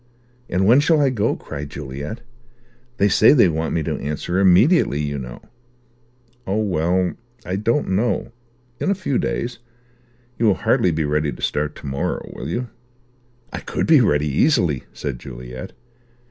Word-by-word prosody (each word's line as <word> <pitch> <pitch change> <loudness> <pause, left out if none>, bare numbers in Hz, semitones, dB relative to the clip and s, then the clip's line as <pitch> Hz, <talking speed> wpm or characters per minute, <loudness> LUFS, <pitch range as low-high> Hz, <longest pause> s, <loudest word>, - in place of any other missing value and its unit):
"And 95 +2 +1
when 120 +7 +6
shall 155 +2 +3
I 140 -2 +3
go?" 110 -3 0
cried 70 0 -7
Juliet. 70 - -6 0.8
"They 100 - +3
say 110 +4 +6
they 125 -9 +6
want 80 0 -1
me 80 - 0
to - - -3
answer 75 +5 -2
immediately, 95 - +4
you 70 -1 -2
know." 60 - -9 1.0
"Oh 95 +3 0
well, 90 -1 +1 0.3
I 90 - -2
don't 115 +8 0
know. 105 +7 0 0.5
In - - -1
a 200 - +2
few 180 -8 -1
days. 120 0 -3 0.8
You 115 - +3
will 100 - +4
hardly 90 - +3
be 80 -2 0
ready 75 0 0
to - - -10
start 75 0 -1
to - - -12
morrow, 70 0 -3
will 65 - -6
you?" 120 +7 -3 0.8
"I - - -3
could - - -3
be 155 -4 +6
ready, 75 -9 +2
easily," 75 - +2
said 70 -4 -5
Juliet. 60 0 -8
90 Hz, 160 wpm, -21 LUFS, 75-115 Hz, 1.0 s, when